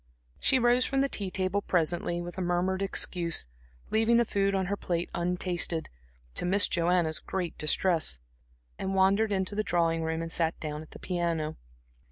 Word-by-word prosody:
She 265 Hz, -, +3 dB
rose 245 Hz, 0 st, +4 dB
from 270 Hz, +1 st, +1 dB
the 275 Hz, -, +2 dB
tea 200 Hz, -7 st, -1 dB
table 185 Hz, +2 st, -1 dB
presently, 175 Hz, -1 st, 0 dB
with 175 Hz, 0 st, -7 dB
a -, -, -1 dB
murmured 180 Hz, +2 st, 0 dB
excuse, 175 Hz, -, 0 dB, 0.5 s
leaving 225 Hz, +2 st, +4 dB
the 235 Hz, -, +4 dB
food 200 Hz, -1 st, +1 dB
on 190 Hz, -1 st, 0 dB
her 200 Hz, +3 st, -1 dB
plate 175 Hz, -3 st, -3 dB
untasted, 175 Hz, -2 st, -1 dB, 0.4 s
to -, -, -5 dB
Miss 195 Hz, +3 st, +4 dB
Joanna's 170 Hz, -2 st, +1 dB
great 180 Hz, -3 st, -4 dB
distress, 155 Hz, -, +2 dB, 0.6 s
and 190 Hz, 0 st, -2 dB
wandered 200 Hz, +3 st, +3 dB
into 190 Hz, 0 st, 0 dB
the 210 Hz, -, 0 dB
drawing 165 Hz, -4 st, +1 dB
room 160 Hz, 0 st, -2 dB
and 165 Hz, -, -6 dB
sat 165 Hz, -1 st, +1 dB
down 150 Hz, -1 st, -4 dB
at 155 Hz, -, -12 dB
the -, -, -11 dB
piano. 170 Hz, -4 st, -2 dB
180 Hz, 175 wpm, -29 LUFS, 165-195 Hz, 0.6 s, rose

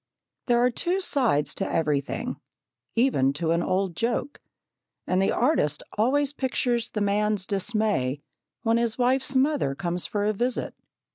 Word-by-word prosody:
There 240 Hz, -1 st, +4 dB
are 245 Hz, +1 st, +3 dB
two 355 Hz, +10 st, -1 dB
sides 245 Hz, -, +1 dB
to 195 Hz, -, -3 dB
everything, 150 Hz, -4 st, -1 dB, 0.6 s
even 225 Hz, -, +3 dB
to 160 Hz, +3 st, -1 dB
an 170 Hz, +1 st, +2 dB
old 185 Hz, -1 st, -1 dB
joke, 235 Hz, -, -2 dB, 0.6 s
and 185 Hz, +1 st, +1 dB
the 195 Hz, -, +2 dB
artist 235 Hz, -, +1 dB
always 275 Hz, +6 st, +2 dB
pictures 245 Hz, -3 st, 0 dB
the 210 Hz, -, -3 dB
man's 205 Hz, -1 st, +1 dB
dismay 200 Hz, -, -1 dB, 0.4 s
when 225 Hz, -1 st, +3 dB
his 235 Hz, -2 st, 0 dB
wife's 260 Hz, +2 st, +1 dB
mother 260 Hz, -, +2 dB
comes 175 Hz, +1 st, -3 dB
for 205 Hz, -1 st, -1 dB
a 215 Hz, -, +2 dB
visit. 245 Hz, +4 st, -2 dB
215 Hz, 145 wpm, -26 LUFS, 180-250 Hz, 0.6 s, There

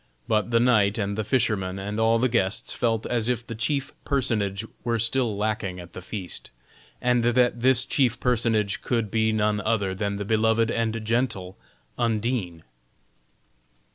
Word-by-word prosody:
But 110 Hz, +1 st, +1 dB
the 115 Hz, -1 st, +3 dB
knight 110 Hz, -4 st, +3 dB
and 100 Hz, -1 st, -1 dB
the 110 Hz, -, -1 dB
fisherman 105 Hz, -5 st, 0 dB
and 105 Hz, +2 st, -4 dB
all 115 Hz, +1 st, +4 dB
the 125 Hz, +3 st, +2 dB
guests 115 Hz, -1 st, 0 dB
felt 115 Hz, -2 st, 0 dB
as 120 Hz, -1 st, 0 dB
if 120 Hz, -1 st, -1 dB
the 115 Hz, -, -6 dB
chief 140 Hz, +5 st, -1 dB
personage 115 Hz, -7 st, -1 dB, 0.2 s
were 115 Hz, -1 st, 0 dB
still 115 Hz, -1 st, 0 dB
lacking 105 Hz, -3 st, -2 dB
at 85 Hz, 0 st, -11 dB
the -, -, -7 dB
feast, 95 Hz, -1 st, -5 dB, 0.5 s
and 125 Hz, -1 st, +2 dB
that 120 Hz, 0 st, +2 dB
this 130 Hz, 0 st, +4 dB
chief 125 Hz, -4 st, +1 dB
personage 115 Hz, -5 st, +1 dB
could 115 Hz, -4 st, -1 dB
be 110 Hz, -1 st, +2 dB
none 105 Hz, -1 st, +1 dB
other 105 Hz, -4 st, 0 dB
than 100 Hz, +1 st, -2 dB
the 100 Hz, 0 st, -4 dB
loved 115 Hz, +1 st, +2 dB
and 115 Hz, -1 st, -1 dB
gentle 110 Hz, -5 st, -1 dB, 0.4 s
Undine. 110 Hz, -7 st, -1 dB
110 Hz, 160 wpm, -25 LUFS, 100-120 Hz, 0.5 s, all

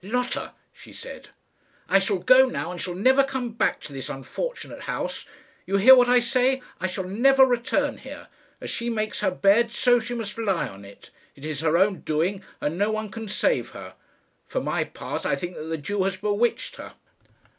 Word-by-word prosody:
"Lotta," 250 Hz, +5 st, -2 dB, 0.2 s
she -, -, -15 dB
said, -, -, -9 dB, 0.6 s
"I 195 Hz, -, +5 dB
shall 195 Hz, 0 st, 0 dB
go 255 Hz, +8 st, +6 dB
now, 165 Hz, -, -4 dB
and 180 Hz, -, -6 dB
shall 180 Hz, -1 st, -3 dB
never 260 Hz, +8 st, +4 dB
come 265 Hz, -3 st, -3 dB
back 225 Hz, -, 0 dB
to 145 Hz, -, -9 dB
this 135 Hz, -1 st, -5 dB
unfortunate -, -, -6 dB
house. -, -, -4 dB, 0.4 s
You 195 Hz, +1 st, +1 dB
hear 240 Hz, +7 st, +9 dB
what 245 Hz, -1 st, +4 dB
I 250 Hz, 0 st, +6 dB
say; 255 Hz, +2 st, +1 dB, 0.2 s
I 185 Hz, -, -1 dB
shall 185 Hz, +1 st, -4 dB
never 265 Hz, +8 st, +5 dB
return 245 Hz, -2 st, 0 dB
here. -, -, -10 dB, 0.3 s
As -, -, -5 dB
she 235 Hz, 0 st, -2 dB
makes 215 Hz, -2 st, -2 dB
her -, -, +2 dB
bed, 205 Hz, +5 st, +3 dB
so 245 Hz, 0 st, +3 dB, 0.2 s
must 225 Hz, -3 st, -5 dB
she 230 Hz, -, -5 dB
lie 185 Hz, -9 st, 0 dB
on 100 Hz, -2 st, -12 dB
it. 100 Hz, -, -15 dB, 0.2 s
It 140 Hz, -, -11 dB
is 155 Hz, -2 st, -3 dB
her 160 Hz, +1 st, +2 dB
own 190 Hz, 0 st, +2 dB
doing, 170 Hz, +6 st, -1 dB, 0.2 s
and 160 Hz, +5 st, -3 dB
no 205 Hz, +1 st, +2 dB
one 215 Hz, -1 st, -3 dB
can 225 Hz, +2 st, -7 dB
save 210 Hz, -, 0 dB
her. -, -, -9 dB, 0.5 s
For -, -, -2 dB
my -, -, -1 dB
part, -, -, -6 dB
I -, -, +1 dB
think 175 Hz, 0 st, -6 dB
that 155 Hz, -, -7 dB
the 160 Hz, 0 st, -3 dB
Jew 200 Hz, +7 st, -2 dB
has 195 Hz, 0 st, -1 dB
bewitched 210 Hz, +4 st, -1 dB
her." -, -, -10 dB
205 Hz, 200 wpm, -25 LUFS, 180-245 Hz, 0.6 s, hear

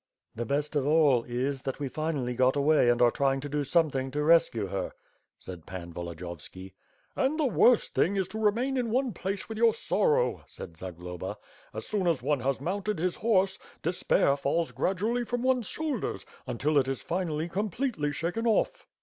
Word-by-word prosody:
"The 120 Hz, 0 st, -4 dB
best 145 Hz, +3 st, -1 dB
of 140 Hz, -1 st, +1 dB
all 150 Hz, -5 st, +4 dB
is, 130 Hz, +3 st, -2 dB
that 135 Hz, +1 st, -4 dB
we 145 Hz, -, -2 dB
finally 140 Hz, -3 st, -2 dB
got 130 Hz, +2 st, +3 dB
away 145 Hz, -3 st, +4 dB
and 120 Hz, 0 st, +4 dB
are 120 Hz, -, +5 dB
tiying 135 Hz, +1 st, +1 dB
to 145 Hz, -, -5 dB
do 145 Hz, +1 st, -1 dB
something 140 Hz, -3 st, +1 dB
to 150 Hz, +2 st, -2 dB
rescue 150 Hz, -10 st, +4 dB
her/' 95 Hz, -1 st, -3 dB, 0.4 s
said 90 Hz, -4 st, -10 dB
Pan 85 Hz, -2 st, -7 dB
Volodiyovski. 85 Hz, +2 st, -8 dB, 0.4 s
"And 280 Hz, +4 st, +1 dB
the 305 Hz, -, +3 dB
worst 245 Hz, -2 st, +4 dB
thing 200 Hz, -, +2 dB
is 190 Hz, -2 st, 0 dB
to 220 Hz, -, -5 dB
remain 235 Hz, +6 st, +1 dB
in 245 Hz, -2 st, 0 dB
one 250 Hz, 0 st, 0 dB
place 190 Hz, +3 st, -4 dB
with 220 Hz, -1 st, -6 dB
your 230 Hz, -1 st, +5 dB
sorrow,'* 480 Hz, -, +1 dB
said 85 Hz, -, -10 dB
Zagloba, 90 Hz, +3 st, -6 dB, 0.3 s
"as 110 Hz, -, -6 dB
soon 200 Hz, -4 st, -1 dB
as 165 Hz, -5 st, +1 dB
one 150 Hz, -2 st, +1 dB
has 135 Hz, +1 st, -1 dB
mounted 195 Hz, +6 st, -2 dB
his 175 Hz, +2 st, -1 dB
horse, 195 Hz, -4 st, +2 dB, 0.2 s
despair 165 Hz, -4 st, +2 dB
falls 145 Hz, +4 st, 0 dB
gradually 215 Hz, +6 st, 0 dB
from 245 Hz, +1 st, -3 dB
one's 255 Hz, -4 st, +2 dB
shoulders, 305 Hz, -7 st, -3 dB, 0.2 s
until 140 Hz, +4 st, +1 dB
it 130 Hz, -, 0 dB
is 135 Hz, 0 st, -3 dB
finally 165 Hz, -3 st, -2 dB
completely 205 Hz, -, -1 dB
shaken 175 Hz, +10 st, -2 dB
off." 220 Hz, -, +1 dB
155 Hz, 185 wpm, -28 LUFS, 130-210 Hz, 0.4 s, are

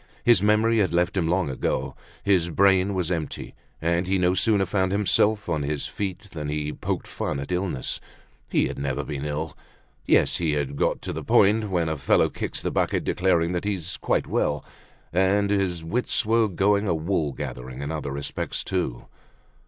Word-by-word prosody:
His 120 Hz, -6 st, +5 dB
memory 110 Hz, +2 st, +3 dB
had 95 Hz, -4 st, +1 dB
left 90 Hz, +2 st, +1 dB
him 90 Hz, -4 st, +1 dB
long 90 Hz, +1 st, +1 dB
ago, 65 Hz, -, -2 dB, 0.3 s
his 90 Hz, -4 st, +3 dB
brain 95 Hz, +2 st, +3 dB
was 90 Hz, -2 st, -1 dB
empty; 80 Hz, -4 st, -4 dB, 0.3 s
and 85 Hz, +2 st, 0 dB
he 95 Hz, +1 st, +2 dB
no 90 Hz, 0 st, +3 dB
sooner 100 Hz, 0 st, +2 dB
found 95 Hz, 0 st, 0 dB
himself 105 Hz, +1 st, +2 dB
on 80 Hz, -4 st, 0 dB
his 70 Hz, 0 st, -2 dB
feet 100 Hz, +1 st, -5 dB
than 75 Hz, -3 st, -5 dB
he 75 Hz, 0 st, -2 dB
poked -, -, -3 dB
fun -, -, -3 dB
at 70 Hz, +5 st, -6 dB
illness. 90 Hz, -7 st, -2 dB, 0.5 s
He -, -, +2 dB
had -, -, -6 dB
never 70 Hz, -2 st, -2 dB
been 70 Hz, -1 st, -5 dB
ill. 75 Hz, +1 st, -3 dB, 0.5 s
Yes, -, -, +4 dB
he 80 Hz, -3 st, 0 dB
had 70 Hz, -1 st, -2 dB
got -, -, 0 dB
to -, -, -4 dB
the -, -, -5 dB
point 105 Hz, +1 st, +4 dB
when 85 Hz, -3 st, +1 dB
a 80 Hz, -1 st, -1 dB
fellow 70 Hz, -, +3 dB
kicks -, -, -5 dB
the -, -, -1 dB
bucket -, -, 0 dB
declaring 85 Hz, -2 st, +2 dB
that 90 Hz, -1 st, -2 dB
he's 95 Hz, -3 st, -3 dB
quite -, -, 0 dB
well. -, -, 0 dB, 0.5 s
And 100 Hz, +3 st, +3 dB
his 95 Hz, -5 st, 0 dB
wits 115 Hz, +9 st, -1 dB
were 115 Hz, 0 st, +3 dB
going 100 Hz, +2 st, +2 dB
a 85 Hz, -, +2 dB
wool 80 Hz, -2 st, 0 dB
gathering 65 Hz, +1 st, -6 dB
in 70 Hz, -, -3 dB
other 75 Hz, -2 st, -3 dB
respects 70 Hz, +1 st, -4 dB
too. 85 Hz, -10 st, -2 dB
90 Hz, 185 wpm, -25 LUFS, 75-100 Hz, 0.5 s, His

